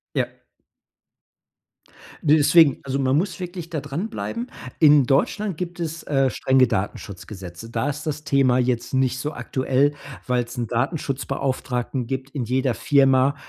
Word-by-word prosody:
Ja. - - +1 2.0
Ne, 155 0 +6
deswegen. 155 -2 +5
Also, 135 0 -2
man 135 0 +2
muss 185 +1 -2
wirklich 175 -2 -6
da 160 -3 -3
dran 145 +9 -4
bleiben. 235 +1 -4 0.3
In 150 -3 +6
Deutschland 185 - +1
gibt 175 +1 -5
es, 165 -1 -4
äh, 135 -2 +2
strenge 130 -1 +3
Datenschutzgesetze. 95 -2 -5
Da 115 +4 -1
ist 150 +2 -5
das 150 -1 -3
Thema 135 -4 +3
jetzt 125 0 -1
nicht 130 -1 +1
so 150 +4 -3
aktuell, 135 +2 0 0.3
weil 125 -1 +1
es 120 +2 -10
'n 120 -2 -3
Datenschutzbeauftragten 135 -2 -2
gibt. 135 +2 -4
In 135 -3 -3
jeder 130 +1 0
Firma, 135 0 +3
135 Hz, 145 wpm, -23 LUFS, 125-150 Hz, 2.0 s, Ne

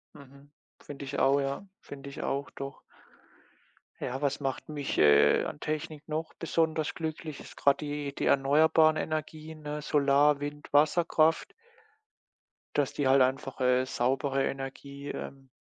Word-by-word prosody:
Mhm, 140 0 -16 0.3
finde 140 -1 -8
ich 140 +1 -5
auch, 140 +1 +4
ja 140 +8 -3
finde 140 0 -9
ich 140 - -8
auch, 140 +1 -2
doch. 140 0 -8 1.2
Ja, 130 +3 -3
was 140 0 0
macht 135 +1 -4
mich, 145 -2 -3
äh, 75 -1 +5
an - - -6
Technik 155 0 -4
noch 160 +1 -3
besonders 160 -2 0
glücklich, 155 -2 -5
ist - - -13
grade 140 -1 +4
die 145 -1 -4
die - - -2
erneuerbaren 155 +3 +4
Energien, 155 0 -4
ne, 150 0 -5
Solar, 145 0 +3
Wind, 145 0 -7
Wasserkraft 155 +2 +3 1.2
dass 145 -2 +1
die 145 - 0
halt 135 +1 +5
einfach, 130 +1 0
äh, 125 0 +3
saubere 135 +2 0
Energie, 140 +1 -6
ähm, 135 -1 -7
140 Hz, 140 wpm, -29 LUFS, 135-155 Hz, 1.2 s, äh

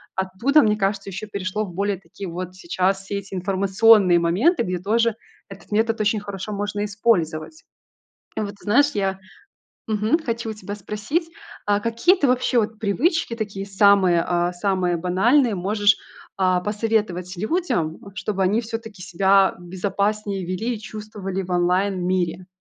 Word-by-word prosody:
оттуда, 190 +11 +2
мне 210 -4 +2
кажется, 195 0 -1
еще 195 +3 -6
перешло 200 +1 -3
в 180 - -10
более 200 +2 -1
такие 195 0 -9
вот 180 +1 -6
сейчас 185 +2 -1
все 200 +1 -5
эти 200 0 -8
информационные 195 +1 +4
моменты, 215 - +2
где 180 -3 -2
тоже 225 +4 +1 0.3
этот 195 +2 -13
метод 225 +1 +1
очень 215 0 +1
хорошо 200 0 -6
можно 205 0 -2
использовать. 205 - -1 0.7
И - - +1
вот, 205 -1 -3
ты 200 - -19
знаешь, 285 +8 +4
я 195 -1 -1 0.7
мгм, 220 +9 +1
хочу 230 -4 -3
у - - -5
тебя 205 -1 -7
спросить, 215 - -3 0.4
а 205 0 +2
какие 230 - +3
ты 290 -7 +1
вообще 250 0 +2
вот 220 0 -3
привычки, 240 - 0
такие 200 -3 -4
самые, 195 -3 +4
а, 175 0 0
самые 180 -1 0
банальные 220 - +3
можешь, 205 +2 +2 0.4
а, 185 -1 +2
посоветовать 210 -3 -1
людям, 215 - -1 0.2
чтобы 200 -1 -2
они 200 +5 +2
все-таки 225 -3 -7
себя 195 +1 +3
безопаснее 200 +2 -2
вели 185 +7 -2
и - - -11
чувствовали 210 -3 -6
в 185 - -9
онлайн 180 +1 +1
мире? 180 -1 -1
200 Hz, 155 wpm, -22 LUFS, 185-220 Hz, 0.7 s, информационные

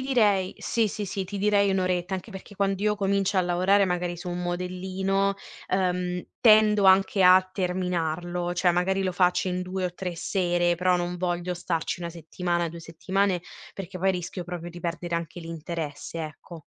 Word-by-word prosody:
direi 210 -8 +2
sì, 230 -2 +1
sì, 205 +1 -4
sì, 195 +1 -3
ti 200 +2 -6
direi 200 0 +3
1 190 - +1
oretta, 180 0 -1
anche 190 +4 -6
perché 195 +1 -10
quando 195 0 0
io 210 0 +2
comincio 200 0 +1
a - - +6
lavorare 185 +3 +3
magari 180 -1 -1
su 180 +1 -7
un 175 0 -3
modellino, 190 +2 -1 0.3
ehm, 180 -1 -1
tendo 215 -2 +6
anche 190 +1 +5
a 185 +1 +8
terminarlo, 175 -2 -1
cioè 180 0 +2
magari 190 +2 +1
lo 185 - 0
facci 180 0 +2
in 180 0 -1
2 185 0 -3
o 175 - -3
3 180 -2 -5
sere, 175 -1 +1
però 180 +1 +2
non 175 0 -2
voglio 175 0 -2
starci 170 0 -2
1 170 -1 -4
settimana, 175 +1 -2
2 170 +1 -9
settimane, 185 +3 0 0.3
perché 190 -2 -7
poi 190 +2 +2
rischio 180 0 -4
proprio 175 0 -6
di 175 - -10
perdere 175 0 -3
anche 170 0 -4
l'interesse, 165 -2 -5
ecco. 155 +1 -8
180 Hz, 180 wpm, -26 LUFS, 175-195 Hz, 0.3 s, a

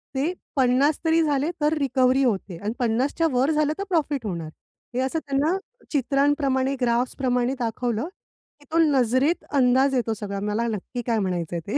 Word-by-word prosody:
ते 300 +7 0 0.2
50 265 +3 +3
तरी 325 +1 +4
झाले, 295 0 +1
तर 300 +1 +3
रिकव्हरी 265 -1 +2
होते. 195 -7 -1
आणि 205 +5 -3
50 245 +3 +1
च्या 330 -1 +3
वर 255 +4 +2
झालं 305 -1 +1
तर 395 - -3
प्रॉफिट 295 -7 0
होणार. 170 -6 -4 0.5
हे 255 - 0
असं 265 +5 -1
त्यांना 295 +5 0 0.3
चित्रांप्रमाणे, 275 -1 +1
ग्राफ्सप्रमाणे 245 +1 +1
दाखवलं, 235 +2 -2 0.5
की 290 - -20
तो 330 - +1
नजरेत 270 +2 +2
अंदाज 265 +1 +3
येतो 235 -3 0
सगळा 200 -2 -5
मला 210 +3 -1
नक्की 225 +3 -4
काय 230 -2 +2
म्हणायचंय 175 -3 -2
ते. 215 - 0
260 Hz, 165 wpm, -24 LUFS, 230-285 Hz, 0.5 s, तरी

